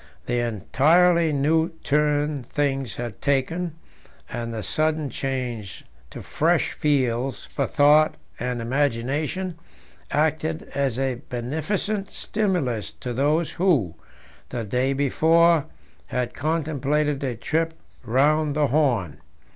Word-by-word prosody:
The 120 0 0
entirely 160 - +3
new 160 +4 +2
turn 150 0 +1
things 135 -2 -1
had 120 -4 -6
taken, 155 +5 0 0.6
and 115 -1 -4
the 110 -2 -4
sudden 155 +1 0
change 125 -7 -4 0.3
to - - -9
fresh - - +1
fields 130 -3 0
for 140 - -2
thought 150 +2 +4 0.2
and 125 -1 -2
imagination, 145 +8 -1 0.5
acted 155 +1 0
as 135 -4 0
a 130 -2 -1
beneficent 160 - -2
stimulus 175 - -1
to 125 - -6
those 150 +6 +1
who, 155 - +2 0.6
the 120 -2 -3
day 125 +6 0
before, 160 +3 +3 0.4
had 125 -1 -2
contemplated 150 -2 0
a 130 -3 -1
trip 160 +7 -1 0.3
round 145 +5 +2
the 150 -1 +3
Horn. 120 - +1
145 Hz, 110 wpm, -24 LUFS, 125-155 Hz, 0.6 s, thought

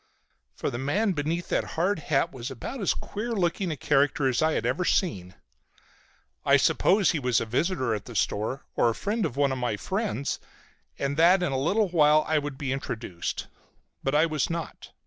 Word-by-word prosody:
For - - -2
the 120 - -4
man 195 +11 +1
beneath 165 +2 -2
that - - +1
hard 185 +3 +1
hat 145 -2 0
was 125 0 -5
about 135 - -6
as 195 - +1
queer 230 +3 -4
a - - -2
looking 180 -1 0
character 140 +1 +2
as 130 - +1
I 160 0 +3
have - - -1
ever 130 +9 0
seen. 95 - 0 1.1
I - - +5
supposed 195 0 +3
he 155 - -1
was 125 -3 +2
a - - -2
visitor 130 +1 0
at 105 -2 -4
the 120 - -10
store, 110 +6 -1
or 120 - +3
a 115 - -2
friend 205 -2 -1
of 130 - -10
one 140 -1 +3
of 130 - -2
my 120 -4 -1
friends, 190 - -2 0.6
and 140 +1 -2
that 180 +3 +5
in 155 - 0
a - - -1
little 195 +8 +1
while 155 -2 +4
I 155 -1 +2
would 145 -2 -5
be 140 -3 -3
introduced. 115 -9 -4 0.6
But 135 +2 -1
I 155 +2 +5
was 155 -4 -1
not. 170 -1 -5
150 Hz, 200 wpm, -27 LUFS, 130-175 Hz, 1.1 s, I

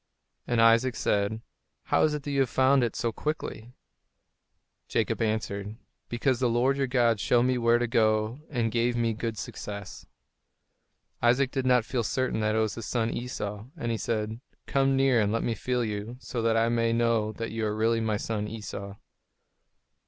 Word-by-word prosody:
And 120 -1 +1
Isaac 115 +2 +5
said, 105 +2 0 0.4
"How - - +2
is 155 -1 +3
it 150 - -5
that 145 - -4
you 135 -2 +2
found 130 +2 +3
it 115 - -1
so 115 - -1
quickly?" 125 -4 -5 1.1
Jacob - - 0
answered, 110 -2 -2 0.3
"Because 120 +1 0
the 125 -2 +2
Lord 125 +4 +2
your 135 -1 0
God 120 -4 +2
showed 120 +4 +3
me 125 0 +1
where 115 0 +4
to 120 - 0
go 110 +1 +1
and 120 -6 -1
gave 120 +1 +1
me 115 -1 +1
good 115 0 -4
success." 100 -1 -7 1.1
Isaac 125 +3 +3
did 130 -2 -1
not 125 -3 +4
feel 125 0 -1
certain 130 +2 -1
that 110 0 +1
it - - +1
was 110 -1 +1
his 115 - -6
son 115 -2 0
Esau, 105 -4 -4
and 120 -6 -2
he 115 - -1
said, 110 0 -2 0.3
"Come 135 -1 +2
near 135 -3 +4
and 105 -1 +1
let 115 - 0
me 115 - 0
feel 125 +2 -1
you, 105 +2 -4
so 125 -2 -4
that 115 0 +2
I 115 0 +3
may 115 -1 +1
know 115 -2 +1
that 115 +2 -5
you 115 0 -3
are 105 - -2
really 115 +1 +2
my 110 -2 0
son 105 -1 -3
Esau." 100 -2 -7
115 Hz, 185 wpm, -28 LUFS, 110-125 Hz, 1.1 s, Isaac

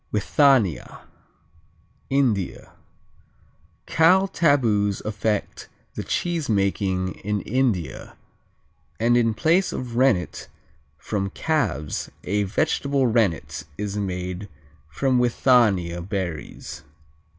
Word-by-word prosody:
Withania 110 - +2 1.1
India 120 -9 0 1.1
Cow 185 +4 +4
taboos 115 - +2
affect 105 0 -2 0.2
the - - -5
cheesemaking 100 - -1
in 105 0 -1
India, 115 - -2 0.8
and 120 +2 +3
in 115 -2 +2
place 170 - +2
of 125 -2 -5
rennet 125 -9 +1 0.5
from 100 +4 -3
calves 95 - -2
a 105 +3 0
vegetable 140 +4 0
rennet 105 - 0
is 105 0 -4
made 90 0 -4 0.4
from 125 - +1
withania 110 -8 +2
berries. 90 -7 -5
105 Hz, 85 wpm, -23 LUFS, 95-130 Hz, 1.1 s, Cow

